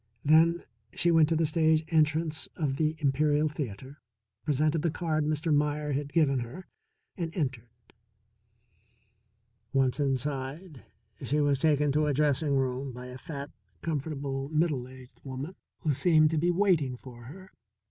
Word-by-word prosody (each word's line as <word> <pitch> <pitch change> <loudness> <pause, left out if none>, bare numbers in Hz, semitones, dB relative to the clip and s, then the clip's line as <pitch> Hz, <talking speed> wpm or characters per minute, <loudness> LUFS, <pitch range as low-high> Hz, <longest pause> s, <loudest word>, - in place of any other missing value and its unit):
Then 165 +3 +5 0.3
she 175 - +3
went 160 -2 +5
to 165 - +2
the 160 0 +2
stage 160 0 +2
entrance 155 0 +1
of 140 -5 -1
the 155 +1 +1
Imperial 150 +1 +2
Theatre, 135 -1 -6 0.4
presented 150 +4 +1
the 170 - +1
card 155 -2 -1
Mr. 155 +1 0
Meier 150 0 0
had 145 +1 -2
given 140 -4 +3
her, 125 +10 -7 0.5
and 170 -2 -3
entered. 130 - -3 2.0
Once 135 0 +2
inside 140 +3 -3 0.4
she 150 +3 0
was 145 -2 +2
taken 150 -1 +3
to 150 +2 +2
a 145 - +1
dressing 145 0 +2
room 130 0 -1
by 125 +1 -9
a 125 +1 -9
fat, 145 -1 -7 0.3
comfortable, 140 -3 -3
middle 150 -5 0
aged 130 -1 -15
woman 140 +7 -6 0.3
who 155 -3 +1
seemed 155 +2 +4
to 160 - +1
be 175 +3 +2
waiting 170 -9 +2
for 120 -2 -12
her. 185 +9 -12
150 Hz, 145 wpm, -29 LUFS, 135-160 Hz, 2.0 s, Then